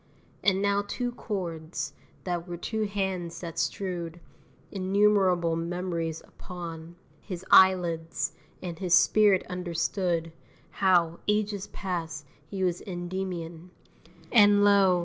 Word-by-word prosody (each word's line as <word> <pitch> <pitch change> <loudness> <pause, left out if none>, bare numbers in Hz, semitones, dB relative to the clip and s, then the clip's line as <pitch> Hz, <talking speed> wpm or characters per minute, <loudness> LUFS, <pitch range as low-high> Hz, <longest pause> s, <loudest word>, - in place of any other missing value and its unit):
And 195 0 +3
now 200 0 +2
two 245 +3 -2
chords, 175 -8 -4 0.3
that 175 -1 -3
were 175 -1 -5
two 215 +4 -2
hands 190 -4 -3
that 165 -2 -5
strewed 175 -1 -3 0.5
Innumerable 190 -3 +2
memories 170 -1 -3
upon 170 -2 -9 0.2
His 185 -2 -7
eyelids 175 -3 +4 0.3
and 170 -2 -5
his 180 -2 +4
spirit 205 +1 +4
understood 175 -1 -1 0.4
How, 175 -2 +2
ages 210 -1 0
past, 165 -6 -4 0.2
he 190 +3 -3
was 180 -1 0
Endymion, 175 -2 -5 0.6
And, 205 -2 +6
lo! 195 -3 +5
180 Hz, 110 wpm, -28 LUFS, 170-195 Hz, 0.6 s, And